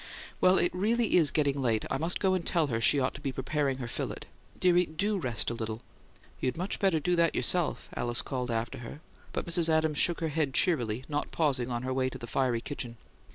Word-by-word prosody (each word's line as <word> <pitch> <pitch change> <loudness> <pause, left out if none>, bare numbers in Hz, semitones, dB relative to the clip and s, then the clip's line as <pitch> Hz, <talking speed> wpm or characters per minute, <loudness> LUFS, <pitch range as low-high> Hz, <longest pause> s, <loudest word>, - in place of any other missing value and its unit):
Well, 185 +1 +5
it 175 - +1
really 225 +5 +1
is 160 -4 +5
getting 140 -2 0
late: 115 -4 0
I - - 0
must 165 +2 0
go 190 -1 +2
and 185 -2 -1
tell 165 -2 +1
her 115 - -1
she 140 +5 +4
ought 130 0 0
to 140 - -10
be 140 -2 -2
preparing 135 +1 -1
her 125 -3 -5
fillet. - - -4 0.4
Dearie, 180 -1 +3
DO 200 +6 0
rest 120 -7 0
a - - -2
little." 110 0 -5 0.6
"You'd 130 +2 -2
much 185 +4 -2
better 190 -6 +2
do 175 +4 +1
that 170 -1 +2
yourself," 175 -3 +1
Alice 120 0 +2
called 125 -2 -4
after 115 +3 -3
her, 120 +4 -9 0.3
but - - -3
Mrs. 170 -1 +3
Adams 160 -1 +2
shook 175 - +3
her 160 - -1
head 145 -3 -1
cheerily, 125 -9 +1
not 145 -1 -3
pausing 135 -6 0
on 120 0 -3
her 130 0 -2
way 130 0 0
to - - -8
the - - -8
fiery 120 -1 0
kitchen. 120 -4 -5
145 Hz, 225 wpm, -29 LUFS, 125-170 Hz, 0.6 s, Well